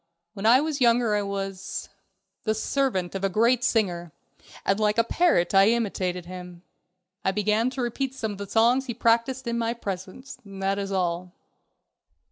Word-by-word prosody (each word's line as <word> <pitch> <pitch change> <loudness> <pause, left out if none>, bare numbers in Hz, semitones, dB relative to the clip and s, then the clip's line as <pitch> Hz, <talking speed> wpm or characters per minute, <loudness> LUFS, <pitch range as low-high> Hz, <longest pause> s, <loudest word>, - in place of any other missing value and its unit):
When 210 0 -2
I 250 +4 +7
was 300 -2 -2
younger 235 -2 +4
I 210 - +2
was... 195 -1 -4 0.6
the 215 -1 0
servant 220 -6 -1
of 195 0 -4
a 195 - +2
great 235 +5 +2
singer, 175 -8 0 0.5
and 195 +2 +2
like 210 0 +1
a 230 - +5
parrot 230 - +2
I 195 +1 +6
imitated 190 -6 -1
him. 180 -1 -9 0.6
I - - +2
began 210 +4 +1
to 260 -1 -4
repeat 260 +2 -2
some 220 -5 -3
of 200 - -8
the 200 -1 -6
songs 245 +4 +3
he 240 - -4
practiced 235 +3 +1
in 235 0 -1
my 230 0 -1
presence. 200 +5 -7
That 195 -1 -2
is 200 0 -4
all." 180 -1 -1
210 Hz, 170 wpm, -25 LUFS, 195-235 Hz, 0.6 s, I